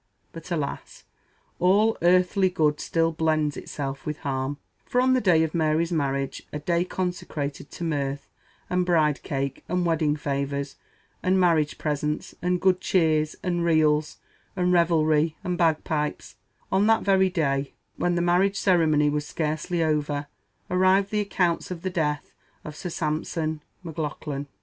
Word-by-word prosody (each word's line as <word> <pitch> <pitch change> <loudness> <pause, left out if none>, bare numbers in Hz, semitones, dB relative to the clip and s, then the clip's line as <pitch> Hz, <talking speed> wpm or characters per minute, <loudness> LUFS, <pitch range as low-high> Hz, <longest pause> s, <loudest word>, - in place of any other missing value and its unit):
But, 165 +1 -10
alas! 150 -5 -4 0.6
"all 205 +5 +4
earthly 185 +2 +4
good 150 -4 +1
still 165 0 +1
blends 155 -2 0
itself 135 0 -5
with 150 0 -4
harm," 135 0 -2 0.3
for 250 - 0
on 255 +1 +4
the 255 - +2
day 170 -5 +4
of 160 - -2
Mary's 160 +1 +1
marriage 140 -4 -1
a - - -3
day 170 +3 0
consecrated 165 -6 -4
to - - -8
mirth, 140 -3 -2 0.4
and 180 0 +1
bride 160 -5 +2
cake, 140 -1 -3
and 180 +1 0
wedding 160 -3 +1
favors, 140 -1 -3 0.5
and 185 +1 +2
marriage 165 -4 +2
presents, 150 0 -2
and 180 0 +1
good 185 -1 +2
cheer, 160 -5 +3 0.2
and 175 -2 0
reels, 155 -2 +2 0.4
and 180 -1 +1
revelry, 160 -2 +3
and 180 -2 -1
bagpipes 155 -2 0 0.4
on 195 +2 +3
that 225 0 +3
very 190 -1 +4
day, 140 -5 -1 0.2
when 175 0 +1
the 170 - +1
marriage 185 +3 +2
ceremony 160 -6 +3
was 145 0 -1
scarcely 160 +2 -1
over, 150 -2 0 0.5
arrived 185 +2 +3
the 210 - +1
accounts 180 -4 0
of 175 -2 -6
the 185 - -2
death 150 -4 -1 0.3
of 150 - -7
Sir 180 - -5
Sampson 155 0 -2 0.2
Maclaughlan! 150 -3 -4
160 Hz, 150 wpm, -25 LUFS, 150-180 Hz, 0.6 s, all